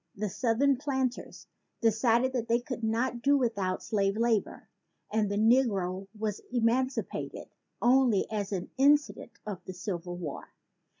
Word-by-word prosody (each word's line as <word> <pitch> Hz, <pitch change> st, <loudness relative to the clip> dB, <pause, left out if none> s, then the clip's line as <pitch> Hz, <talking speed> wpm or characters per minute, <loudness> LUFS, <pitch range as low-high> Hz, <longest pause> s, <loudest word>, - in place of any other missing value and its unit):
The 210 Hz, +1 st, -2 dB
southern 255 Hz, +6 st, +2 dB
planters 265 Hz, -2 st, -3 dB, 0.3 s
decided 230 Hz, +3 st, +2 dB
that 235 Hz, -3 st, -2 dB
they 235 Hz, 0 st, +3 dB
could 245 Hz, -1 st, -6 dB
not 235 Hz, +2 st, 0 dB
do 280 Hz, +3 st, +4 dB
without 205 Hz, -8 st, -1 dB
slave 200 Hz, -2 st, 0 dB
labor; 230 Hz, -2 st, 0 dB, 0.4 s
and 215 Hz, -1 st, +1 dB
the 200 Hz, -, -1 dB
negro 205 Hz, -5 st, +2 dB
was 210 Hz, -1 st, -3 dB
emancipated 250 Hz, +2 st, -1 dB, 0.3 s
only 245 Hz, -4 st, +4 dB
as 205 Hz, -2 st, -2 dB
an 185 Hz, -3 st, -4 dB
incident 290 Hz, +2 st, +3 dB
of 195 Hz, -4 st, -6 dB
the 185 Hz, -, -6 dB
Civil 175 Hz, -1 st, -5 dB
War. 160 Hz, -6 st, -7 dB
225 Hz, 135 wpm, -29 LUFS, 200-255 Hz, 0.4 s, do